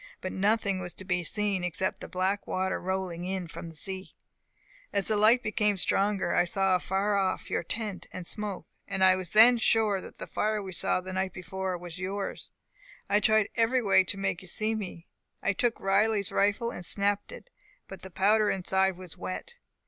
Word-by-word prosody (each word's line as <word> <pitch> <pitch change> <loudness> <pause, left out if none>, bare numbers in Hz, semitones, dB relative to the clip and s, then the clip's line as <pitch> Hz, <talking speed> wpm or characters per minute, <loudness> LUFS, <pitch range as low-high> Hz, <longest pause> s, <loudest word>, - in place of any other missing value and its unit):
But 185 - -4
nothing 200 -1 +1
was 180 -1 -6
to 190 - -8
be 180 -1 0
seen 200 +1 -1
except 180 +2 -2
the - - -6
black 190 +2 -1
water 190 0 -1
rolling 185 -2 -3
in 185 -1 -3
from 165 +1 -8
sea. 190 +4 -4 0.8
As 200 -2 0
the 215 - +2
light 220 +4 +5
became 210 -1 +1
stronger, 195 -1 +2
I - - +4
saw 195 +1 +1
afar 195 +3 0
off 190 -1 -1
your - - +1
tent 205 +2 -3
and 180 - -7
smoke, 205 0 -5 0.2
and 195 -1 0
I 185 0 +7
was 185 -2 -5
then 230 +5 +7
sure 215 -4 +2
that - - -12
the - - -6
fire 215 0 -1
we 195 -2 -6
saw 180 - 0
the 185 +1 -7
night 190 0 -1
before 185 0 -4
was 175 0 -9
yours. 195 +1 -4 0.6
I 205 - +4
tried 215 0 +3
every 235 +2 +2
way 195 -2 +5
to 200 - -2
make 195 -3 -2
you 185 - -12
see 215 +5 0
me. 185 -5 -6 0.4
I 200 - +2
took 235 +4 +1
Riley's 200 +1 +2
rifle, 205 +4 +1
and 180 - -7
snapped 200 - 0
it, - - -12 0.4
but 195 -2 -10
the 190 - -9
powder 210 +3 +3
inside 190 0 +1
was 180 -1 -10
wet. 185 - -5
195 Hz, 195 wpm, -29 LUFS, 185-210 Hz, 0.8 s, I